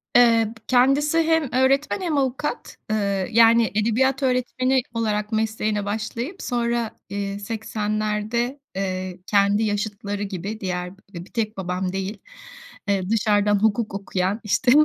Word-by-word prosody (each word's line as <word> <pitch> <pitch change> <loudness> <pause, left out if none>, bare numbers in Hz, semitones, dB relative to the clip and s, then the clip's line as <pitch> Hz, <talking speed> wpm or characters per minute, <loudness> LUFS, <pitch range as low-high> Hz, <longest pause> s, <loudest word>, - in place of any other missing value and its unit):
Eee, 230 -2 +5
kendisi 275 +5 +3
hem 320 -4 +2
öğretmen 275 +7 +2
hem 325 -5 0
avukat. 270 - -2
Iıı, 200 -3 0
yani 230 0 +5
edebiyat 260 +5 +2
öğretmeni 255 0 +1
olarak 215 -1 -1
mesleğine 215 -1 0
başlayıp 225 - -4
sonra, 235 -2 -1 0.2
eee, 200 0 -3
80'lerde, 215 0 -2 0.5
eee, 185 -1 -3
kendi 205 +1 +3
yaşıtları 205 -1 -2
gibi 200 +2 -5
diğer 180 -1 -3 0.2
bir 170 +1 -7
tek 215 -2 -3
babam 180 0 -2
değil. 195 +2 -3 0.7
Eee, 195 -1 0
dışarıdan 205 -2 +3
hukuk 220 -1 +1
okuyan, 195 +1 -1
işte 245 +4 +2
215 Hz, 120 wpm, -23 LUFS, 200-245 Hz, 0.7 s, Eee